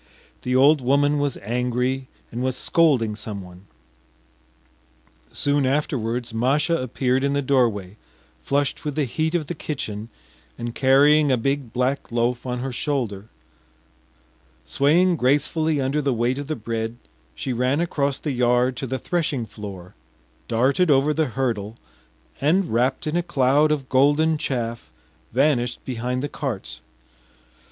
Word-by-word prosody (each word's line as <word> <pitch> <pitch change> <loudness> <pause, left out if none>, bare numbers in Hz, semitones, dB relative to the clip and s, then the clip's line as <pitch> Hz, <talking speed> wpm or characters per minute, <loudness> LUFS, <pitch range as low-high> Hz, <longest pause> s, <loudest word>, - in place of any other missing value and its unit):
The 125 0 -1
old 140 +3 +5
woman 145 +3 +2
was 145 -2 -1
angry 125 +3 -1 0.2
and 120 - -4
was 130 0 -1
scolding 130 -12 +2
someone. 100 -3 -8 1.7
Soon 145 0 +1
afterwards 125 -4 -1
Masha 140 +8 +2
appeared 130 +1 0
in 140 0 +1
the 140 - +1
doorway, 110 -8 +1 0.4
flushed 140 0 -1
with 150 -2 -3
the 150 -2 +1
heat 160 +6 -1
of 165 -3 0
the 175 - -4
kitchen 115 -9 -5 0.5
and 120 -1 -5
carrying 145 +3 +4
a 130 - +3
big 135 0 -1
black 125 +3 -1
loaf 120 +2 0
on 125 0 -2
her 135 +1 -3
shoulder; 120 -7 -2 1.4
swaying 170 +5 +3
gracefully 150 +4 +1
under 135 +3 0
the 135 -3 0
weight 120 +4 0
of 145 - -6
the 155 - -2
bread, 115 -1 -4 0.4
she 130 - -3
ran 125 +4 +1
across 140 -5 0
the 150 - -3
yard 125 0 +2
to 135 - -4
the 130 +2 -2
threshing 150 -7 -1
floor, 100 -4 -9 0.5
darted 135 +10 +2
over 140 +1 +4
the 160 +1 +1
hurdle, 115 -4 -2 0.7
and, 165 - +2
wrapt 125 +3 +1
in 155 +1 -2
a 175 - +2
cloud 150 -2 +2
of 140 -3 -1
golden 145 +4 +3
chaff, 120 -4 -3 0.4
vanished 125 -2 +1
behind 125 +1 -3
the - - -1
carts. 110 - -5
130 Hz, 140 wpm, -23 LUFS, 120-145 Hz, 1.7 s, old